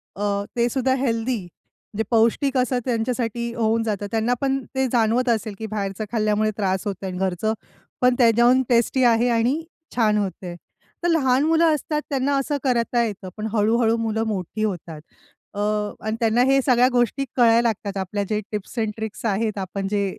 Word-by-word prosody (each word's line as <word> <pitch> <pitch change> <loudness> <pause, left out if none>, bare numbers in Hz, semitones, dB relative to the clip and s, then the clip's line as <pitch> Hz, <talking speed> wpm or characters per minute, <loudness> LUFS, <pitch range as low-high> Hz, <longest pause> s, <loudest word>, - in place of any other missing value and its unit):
अ, 200 0 -1
ते 235 0 +2
सुद्धा 260 0 +1
हेल्दी, 230 -5 -1 0.5
जे 220 - +1
पौष्टिक 235 +4 +2
असं 250 0 +1
त्यांच्यासाठी 235 -1 -2
होऊन 225 0 +1
जातं. 205 -2 -2
त्यांना 225 +2 +1
पण 270 -1 0
ते 265 0 +1
जाणवत 240 +1 +2
असेल 220 -2 0
की 220 - -4
बाहेरचं 205 0 -3
खाल्ल्यामुळे 215 -1 +1
त्रास 190 -2 -1
होतोआणि 190 -2 -4
घरचं 190 +3 -1 0.5
पण 250 0 +4
त्याहून 240 +2 +5
टेस्टी 240 +2 +2
आहे 240 0 +4
आणि 240 +7 +1 0.3
छान 215 -3 +3
होतं 195 -3 -3
आहे. 175 - -6 0.5
तर - - +2
लहान 270 -5 +3
मुलं 325 0 +4
असतात, 300 +1 -2
त्यांना 280 0 0
असं 285 +2 -1
करता 240 -2 +1
येतं, 200 -4 -5
पण 215 - -4
हळू-हळू 225 +1 +2
मुलं 225 -1 -1
मोठी 205 0 -3
होतात. 170 -6 -4 0.5
अ, 205 - -6 0.5
आणि 220 0 -1
त्यांना 230 +1 +2
हे 270 +1 +4
सगळ्या 250 -1 +5
गोष्टी 245 +3 +1
कळायला 235 -2 +5
लागतात, 200 -3 -3
आपल्या 195 +2 -2
जे 210 -1 0
टिप्स 210 +3 -6
एंड 220 -1 0
ट्रिक्स 220 0 -6
आहेत, 215 0 0
आपण 195 +1 -4
जे 200 -1 +1
230 Hz, 170 wpm, -23 LUFS, 210-250 Hz, 0.5 s, त्याहून